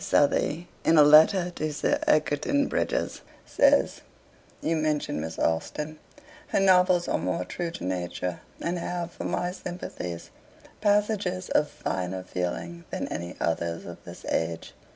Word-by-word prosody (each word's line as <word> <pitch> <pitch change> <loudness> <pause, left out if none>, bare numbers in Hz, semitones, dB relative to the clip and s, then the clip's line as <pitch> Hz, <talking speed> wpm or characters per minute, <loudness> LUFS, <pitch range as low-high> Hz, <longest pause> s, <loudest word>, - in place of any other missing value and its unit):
Southey, 155 0 +2 0.2
in 165 - +4
a 150 - +9
letter 160 +5 +6
to 155 -3 -3
Sir 145 - 0
Egerton 155 - +2
Brydges, - - -1 0.2
says: - - +3 0.6
'You 165 - 0
mention 155 - 0
Miss 80 +1 -5
Austen. 150 - -1 0.5
Her - - +1
novels 180 -2 +4
are - - 0
more 90 +1 -1
true 175 -1 -3
to 170 - -8
nature, 90 -1 -3 0.2
and 175 +1 -2
have, 175 0 -3
for - - -7
my 175 0 -1
sympathies, 175 - -6 0.5
passages 205 -3 +1
of 150 - +3
finer 95 0 -3
feeling 90 - -4
than - - -3
any 85 +2 -5
others 85 0 -1
of 85 - -9
this - - -11
age. 80 0 -2
155 Hz, 140 wpm, -27 LUFS, -, 0.6 s, a